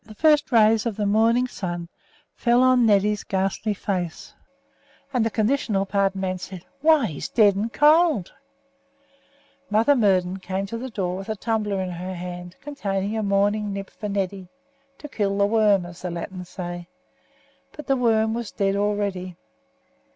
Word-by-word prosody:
The 215 - -14
first 300 +2 +3
rays 225 -1 +4
of 225 - -3
the 210 - -1
rising 225 +4 +3
sun 175 -7 -5 0.5
fell 240 +1 +3
on 255 -2 +4
Neddy's 210 0 +2
ghastly 195 +2 -1
face, 180 -5 -4 0.8
and 245 -3 +2
the 225 - +1
"conditional 215 -3 0
pardon" 195 -1 0
man 185 -1 -2
said, 185 -1 -9 0.2
"Why, 310 -3 +5
he's 155 -9 -5
dead 205 -4 +4
and 215 +4 -2
cold." 300 - +3 1.4
Mother 225 +7 +4
Murden 190 -5 +2
came 190 +1 -3
to 230 +4 -5
the 260 +2 -5
door 185 -5 -3
with 195 +2 -8
a 220 - -1
tumbler 210 -2 -1
in 185 -1 -3
her 180 +2 -5
hand, 180 0 -7
containing 205 -8 -3
a 220 - -1
morning 205 +1 +1
nip 195 0 -6
for 210 +2 -6
Neddy, 195 -1 -3 0.5
"to 295 - -9
kill 200 -7 -1
the 200 - +4
worm," 205 -3 +3
as 175 0 -11
the 180 - -3
Latins 180 +1 -6
say; 175 -1 -6 0.8
but 300 - -10
the 270 - +2
worm 220 -3 +2
was 235 -1 -4
dead 195 -1 0
already. 200 -3 -2
205 Hz, 165 wpm, -24 LUFS, 190-225 Hz, 1.4 s, Why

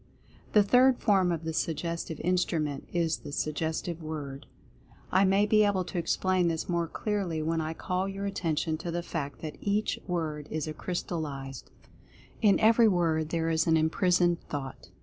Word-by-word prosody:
The 210 - +6
Third 250 +4 +5
Form 190 -5 +3
of 165 -1 -2
the 160 0 -3
Suggestive 165 0 -2
Instrument 160 -5 -1
is 165 -2 +1
The - - -9
Suggestive 160 +3 -2
Word. 145 -3 -6 0.6
I 190 +2 +4
may 195 +2 +4
be 215 0 +4
able 200 -3 +2
to 175 0 -4
explain 185 +1 +1
this 165 -1 -2
more 170 -1 0
clearly 185 -5 -2
when 165 +1 0
I 160 +1 -3
call 185 +3 -2
your 195 +1 -4
attention 160 -5 -1
to 175 - -5
the 170 +1 -2
fact 145 -5 -5
that 155 -2 -6
EACH 205 +1 0
WORD 155 -4 -3
IS 155 0 -3
A 155 - -4
CRYSTALLIZED 150 -6 -4
THOUGHT. - - -27 0.5
In 205 -3 +5
every 225 +1 +6
word 165 -5 +1
there 165 -1 0
is 160 0 +1
an 160 -1 +5
imprisoned 175 +2 +2
Thought. 135 -3 -6
170 Hz, 170 wpm, -29 LUFS, 155-185 Hz, 0.6 s, The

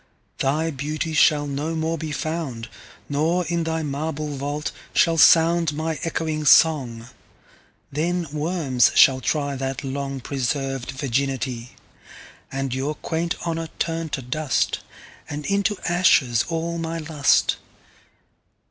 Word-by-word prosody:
Thy 155 +4 +1
Beauty 155 +3 -3
shall 150 -1 +4
no 145 +3 -3
more 160 +1 -1
be 160 -2 -5
found; 145 -6 -4 0.4
Nor, 160 +5 +1
in 170 +1 -1
thy 160 0 -1
marble 150 +1 -3
Vault, 145 +2 -3 0.2
shall 165 -1 +3
soundMy 160 -1 +4
ecchoing 155 -2 -2
Song: 125 -8 +4 0.8
then 170 +4 -1
Worms 150 -6 +2
shall 130 -1 +6
tryThat 135 -2 -2
long 135 0 -4
preserv'd 135 0 -2
Virginity:And 135 0 -5
your 135 +4 -2
quaint 170 +2 -2
Honour 165 -1 -2
turn 165 -1 -2
to 135 -3 -4
dust; 140 +3 0 0.5
And 150 0 -5
into 200 +1 +1
ashes 135 -10 +3
all 170 0 -2
my 165 0 -3
Lust. 150 -3 +2
150 Hz, 110 wpm, -23 LUFS, 135-165 Hz, 0.8 s, shall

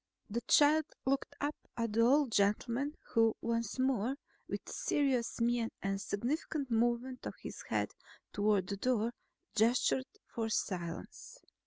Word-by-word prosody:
The 235 +3 -1
child 305 +1 +6 0.2
looked 275 +1 0
up 290 +1 0 0.2
at 230 -2 -1
the 230 - +3
old 265 +2 +4
gentleman 235 +8 +1
who 225 -1 +3
once 230 -1 -1
more, 260 -1 +1 0.3
with - - -4
serious 265 -6 0
mien 235 0 +2
and 195 0 0
a - - -8
significant 270 +6 -2
movement 240 +2 0
of - - -6
his - - -7
head - - 0 0.4
toward 205 -2 +2
the 200 +2 -4
door, 235 +1 +1 0.4
gestured 245 +4 +3 0.3
for 225 -1 -1
silence. 180 - -3
235 Hz, 140 wpm, -34 LUFS, 215-265 Hz, 0.4 s, child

